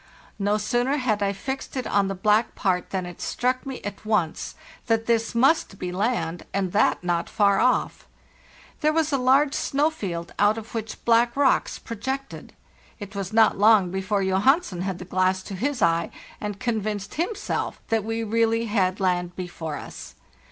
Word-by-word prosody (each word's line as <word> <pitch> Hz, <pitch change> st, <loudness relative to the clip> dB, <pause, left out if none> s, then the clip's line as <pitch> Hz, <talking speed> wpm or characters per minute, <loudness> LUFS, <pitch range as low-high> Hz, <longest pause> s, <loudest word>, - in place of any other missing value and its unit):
No 205 Hz, +1 st, +1 dB
sooner 245 Hz, +5 st, 0 dB
had 225 Hz, -6 st, 0 dB
I 200 Hz, -1 st, +2 dB
fixed 265 Hz, +7 st, -5 dB
it 255 Hz, -, -2 dB
on 200 Hz, -1 st, +2 dB
the 195 Hz, -, -3 dB
black 210 Hz, +4 st, +2 dB
part 180 Hz, -2 st, 0 dB
than 185 Hz, -2 st, -2 dB
it 175 Hz, -1 st, -9 dB
struck 255 Hz, +2 st, -1 dB
me 265 Hz, -2 st, -5 dB
at 205 Hz, -, -6 dB
once 210 Hz, -7 st, -1 dB, 0.3 s
that 225 Hz, -1 st, +1 dB
this 230 Hz, 0 st, 0 dB
must 260 Hz, -4 st, +3 dB
be 180 Hz, -1 st, -4 dB
land, 180 Hz, -4 st, -1 dB
and 190 Hz, -2 st, 0 dB
that 205 Hz, -2 st, +2 dB
not 175 Hz, -1 st, -1 dB
far 200 Hz, -2 st, +3 dB
off. 255 Hz, -, +1 dB, 0.7 s
There 305 Hz, 0 st, +3 dB
was 315 Hz, -1 st, +1 dB
a 275 Hz, -, +2 dB
large 270 Hz, +3 st, +4 dB
snow 295 Hz, +3 st, +1 dB
field 175 Hz, -, -5 dB
out 205 Hz, +2 st, +4 dB
of 225 Hz, 0 st, -8 dB
which 220 Hz, -1 st, -5 dB
black 235 Hz, +2 st, +3 dB
rocks 280 Hz, -2 st, +2 dB
projected. 265 Hz, +5 st, -6 dB, 0.5 s
It 205 Hz, -1 st, -8 dB
was 195 Hz, -2 st, -4 dB
not 220 Hz, -2 st, +4 dB
long 205 Hz, -4 st, +5 dB
before 190 Hz, +1 st, -1 dB
Johansen 190 Hz, -, +2 dB
had 190 Hz, -1 st, -2 dB
the 180 Hz, -, -8 dB
glass 185 Hz, +1 st, +1 dB
to 195 Hz, -, -8 dB
his 250 Hz, +5 st, -1 dB
eye, 165 Hz, 0 st, +2 dB, 0.3 s
and 210 Hz, -1 st, -5 dB
convinced 215 Hz, -4 st, -2 dB
himself 380 Hz, +6 st, -2 dB
that 225 Hz, -2 st, +1 dB
we 225 Hz, +1 st, -2 dB
really 230 Hz, +1 st, +1 dB
had 195 Hz, -4 st, 0 dB
land 180 Hz, -2 st, 0 dB
before 165 Hz, -4 st, -5 dB
us. 60 Hz, -, -9 dB
210 Hz, 175 wpm, -24 LUFS, 190-245 Hz, 0.7 s, long